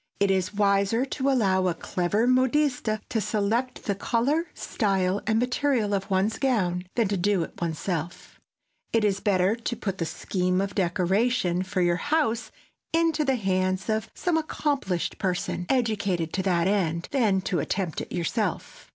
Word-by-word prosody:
It 200 -1 +3
is 190 0 0
wiser 200 +4 +2
to 275 0 -1
allow 190 -8 +2
a 175 - 0
clever 185 +7 0
modiste 255 0 +2 0.2
to 225 - -1
select 215 +4 -1
the 200 - 0
color, 265 - 0
style 195 -3 0
and 220 - +2
material 250 -3 +1
of 195 0 -2
one's 200 +3 +1
gown 185 -10 +1
than 230 -3 +2
to 200 - -1
do 190 -1 +1
it - - -10
one's 165 -2 -1
self. 175 -2 -5 0.5
It 225 -1 +2
is 195 -2 +1
better 195 0 +2
to 235 +1 -4
put 195 -4 -4
the 165 - -1
scheme 180 +1 -1
of 195 +1 -2
decoration 185 +1 +1
for 190 0 -2
your 175 0 +2
house 290 - 0 0.4
into 330 -1 +2
the 270 -2 +2
hands 185 -2 0
of 220 0 -1
some 350 -3 0
accomplished 285 - -1
person, 180 -1 -2
educated 200 -10 0
to 190 - 0
that 180 -2 +1
end, 175 -4 0
than 220 -8 +2
to 180 -2 -1
attempt 180 +3 -2
it - - -8
yourself. 170 -2 -3
200 Hz, 165 wpm, -26 LUFS, 185-240 Hz, 0.5 s, It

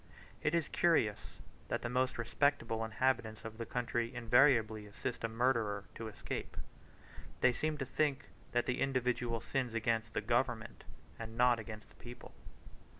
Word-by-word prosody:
It 150 +3 +1
is 165 -3 +1
curious 135 -12 +1 0.3
that - - -2
the - - 0
most 130 +1 0
respectable 115 -2 +1
inhabitants 110 -1 0
of 110 0 -7
the 115 - -4
country 120 -1 -1
invariably 115 -3 +4
assist 115 +4 -5
a - - +2
murderer 115 -3 +1
to 115 - -6
escape: 105 - -5 0.8
they 125 - +5
seem 155 +4 -1
to 135 - -2
think 140 +1 0 0.3
that 120 0 +1
the 125 - -1
individual 125 -3 0
sins 125 -4 -2
against 115 0 0
the - - +1
government, 120 -2 -1 0.3
and 115 0 -7
not 120 -1 +5
against 110 -1 -8
the - - -21
people. 120 0 -10
120 Hz, 150 wpm, -35 LUFS, 110-130 Hz, 0.8 s, they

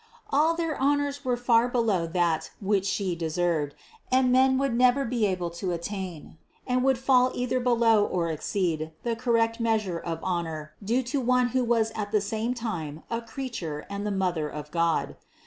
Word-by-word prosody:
All 310 +4 +3
their 330 -2 -1
honors 285 0 +1
were 250 -2 0
far 240 -1 +3
below 225 -9 +1
that 170 -2 0
which 200 -1 +1
She 190 -2 -1
deserved, 165 -2 -1 0.4
and 255 0 +4
men 260 +1 +4
would 270 -2 0
never 255 +3 +4
be 230 -3 +1
able 180 -3 -2
to 175 +2 -3
attain, 170 -3 -6 0.3
and 250 0 +1
would 265 -1 +3
fall 255 0 +3
either 250 +1 0
below 230 -3 +4
or 170 -4 -1
exceed, 160 -1 -2
the 235 -1 -1
correct 230 -1 +1
measure 215 -7 0
of 165 -1 -4
honor 160 -4 -3
due 240 +6 +1
to 265 +3 -2
One 250 0 +2
who 255 +1 +1
was 230 -2 +2
at 210 -2 -4
the 210 - +3
same 220 +4 -2
time 165 -10 -5
a 230 0 -1
creature 225 - -5
and 200 0 -3
the 210 - -1
Mother 180 -6 -1
of 150 0 -8
God. 170 -1 0
220 Hz, 180 wpm, -27 LUFS, 175-250 Hz, 0.4 s, and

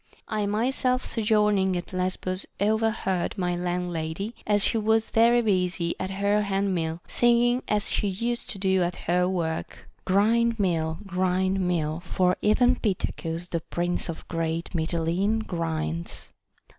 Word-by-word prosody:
1 210 -2 -1
myself 255 +3 +1
sojourning 210 -4 +2
at 175 - -7
Lesbos 185 +1 -1
overheard 215 -3 0
my 180 -2 0
landlady, 175 +2 -3
as 205 -1 +3
she - - +1
was 220 +1 +1
very 235 +1 +4
busy 180 -4 +1
at 185 - -3
her 200 +2 +1
hand 200 -1 0
mill, 165 -1 -2
singing 240 +1 +3
as 210 -1 +1
she 205 - +1
used 235 +5 -1
to 200 - +1
do 190 -1 +2
at 175 0 0
her 180 +1 +1
work, 165 -3 -3
" - - -39
Grind 230 +4 +3
mill; 160 -4 0
grind 185 0 0
mill; 165 -4 0
for 180 +1 +1
even 245 +4 +3
Pittacus, 175 -4 -3
the 170 - -1
prince 175 +2 -2
of 165 - -7
great 165 0 -2
Mitylene, 175 +6 0
grinds." 165 -1 -3
190 Hz, 145 wpm, -26 LUFS, 175-215 Hz, -, very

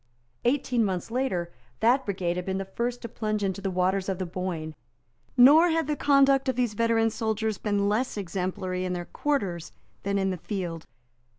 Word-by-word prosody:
Eighteen 250 -2 +2
months 190 0 -2
later, 190 -9 -1 0.3
that 255 +4 +3
brigade 185 -3 -1
had 180 - -3
been 190 0 -1
the 195 - -3
first 240 +6 -3
to - - -3
plunge 215 -2 -2
into 195 0 -2
the 195 - -1
waters 185 +1 0
of 190 - -1
the 185 - -3
Boyne. 170 -3 -4 0.6
Nor 300 +8 +8
had 325 -1 +1
the 300 +1 -1
conduct 275 -2 +4
of 260 - 0
these 245 -3 0
veteran 225 0 +2
soldiers 220 -1 -1
been 205 -1 0
less 215 +3 0
exemplary 185 0 -3
in 185 0 -2
their 175 -1 -4
quarters 195 - -2 0.3
than 200 0 -1
in 190 -1 +1
the 185 - -3
field. 175 -3 -5
205 Hz, 185 wpm, -27 LUFS, 185-245 Hz, 0.6 s, Nor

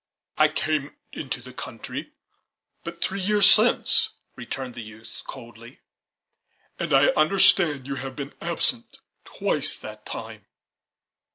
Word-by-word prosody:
"I 155 - +5
came 155 -2 -2 0.2
into 125 -4 -6
the 125 +1 -12
country 115 -2 -8 0.7
but 170 0 -6
three 195 - -3 0.2
weeks 205 -2 +6
since," - - +6 0.3
returned 125 +1 -6
the 120 - -8
youth 110 +1 -12
coldly, 115 -2 -12 1.0
"and 170 -3 -3
I 135 0 +5
understand 155 -4 +3
you 140 - -4
have 135 0 -7
been 140 0 -7
absent 225 +8 -2 0.3
twice - - -1
that - - -11
time." - - -8
140 Hz, 120 wpm, -24 LUFS, 125-170 Hz, 1.0 s, weeks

